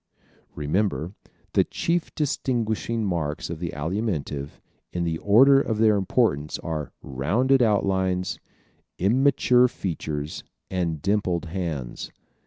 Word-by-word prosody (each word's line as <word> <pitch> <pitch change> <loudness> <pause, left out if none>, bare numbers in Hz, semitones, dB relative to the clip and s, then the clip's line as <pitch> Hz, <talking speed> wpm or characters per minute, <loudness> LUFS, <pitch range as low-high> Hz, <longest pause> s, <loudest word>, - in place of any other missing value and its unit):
_Remember, 85 +3 -1 0.4
the - - +5
chief 170 0 -2
distinguishing 115 -6 -1
marks 85 -5 -2
of 85 - -5
the 85 -1 -3
Alimentive 75 -4 -3 0.3
in 85 - -2
the 80 -1 -1
order 135 +7 +6
of 110 -5 -1
their 110 -1 +4
importance 75 -6 +1
are 80 -3 -4
ROUNDED 115 - +2
OUTLINES, 95 -4 +1 0.6
IMMATURE 125 +3 +4
FEATURES 75 -8 -4 0.3
and 85 -5 -2
DIMPLED 95 -3 0
HANDS. 80 -8 -4
95 Hz, 105 wpm, -25 LUFS, 80-110 Hz, 0.6 s, order